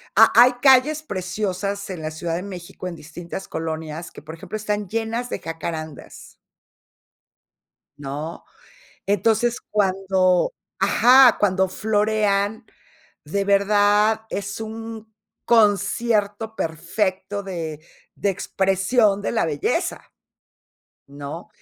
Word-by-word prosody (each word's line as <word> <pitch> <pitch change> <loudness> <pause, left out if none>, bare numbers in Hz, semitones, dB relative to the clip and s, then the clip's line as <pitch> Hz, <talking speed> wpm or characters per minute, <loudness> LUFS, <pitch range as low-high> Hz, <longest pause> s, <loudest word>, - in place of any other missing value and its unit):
Ha - - +7
hay 250 +1 +8
calles 275 +3 +5
preciosas 200 - -3
en 180 -4 -6
la 155 - -3
Ciudad 165 +1 -3
de 175 - -3
México, 185 -2 -8
en 175 - -6
distintas 170 +4 -8
colonias, 160 0 -5
que, - - -12
por 155 +2 -9
ejemplo, 165 - -8
están 210 -1 -2
llenas 225 +3 -3
de - - -3
jacarandas 160 -2 -7 1.6
¿no? 145 +4 -6 0.6
Entonces, 225 +4 +2
cuando 190 - +2 0.3
Ajá, 255 0 +6
cuando 190 -2 +2
florean, 210 +1 0 0.6
de 200 +7 -1
verdad 205 +2 +3
es 200 +2 -4
un 220 0 -8 0.3
concierto 215 0 +2
perfecto 185 +4 -2
de 165 -5 -5 0.4
de 200 - 0
expresión 195 +3 +1
de - - -2
la 225 - +1
belleza, 150 -3 -2 1.0
¿no? 145 +7 -8
200 Hz, 105 wpm, -22 LUFS, 175-215 Hz, 1.6 s, hay